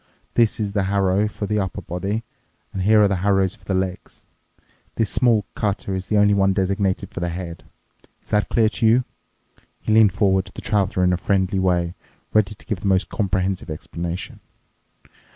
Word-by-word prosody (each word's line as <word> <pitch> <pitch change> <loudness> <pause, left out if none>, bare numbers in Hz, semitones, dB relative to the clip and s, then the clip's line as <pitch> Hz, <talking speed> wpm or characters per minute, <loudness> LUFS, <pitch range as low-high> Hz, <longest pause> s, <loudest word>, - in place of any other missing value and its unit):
This 115 -2 +2
is 105 -2 -1
the 100 -2 0
harrow 100 +1 +2
for 105 0 -5
the 105 +1 0
upper 95 -3 -3
body, 100 +6 -3 0.5
and 95 - -3
here 105 +3 +5
are 105 - +6
the 100 -1 0
harrows 95 0 +2
for - - -17
the 95 - -1
legs. 95 -1 -4 0.7
This 110 -3 0
small 115 -5 +3
cutter 100 -2 -2
is 95 -1 -4
the 105 - +1
only 105 0 +5
one 95 -1 +3
designated 95 0 -1
for - - -5
the 85 0 -1
head. 85 -1 -6 0.6
Is - - -23
that 105 -3 +1
clear 110 -2 +3
to 115 - -2
you?" 120 +3 +4 0.8
He 110 - -1
leaned 110 -4 +6
forward 95 -2 +2
to - - -14
the - - -8
Traveler 100 -3 +1
in 90 0 +3
a - - +1
friendly 95 +1 0
way, 90 -2 +1 0.4
ready 105 -1 +2
to - - -17
give 105 -5 -3
the 100 - -3
most 95 -1 +2
comprehensive 95 -3 -1
explanation. 85 +3 -5
95 Hz, 190 wpm, -22 LUFS, 95-105 Hz, 0.8 s, are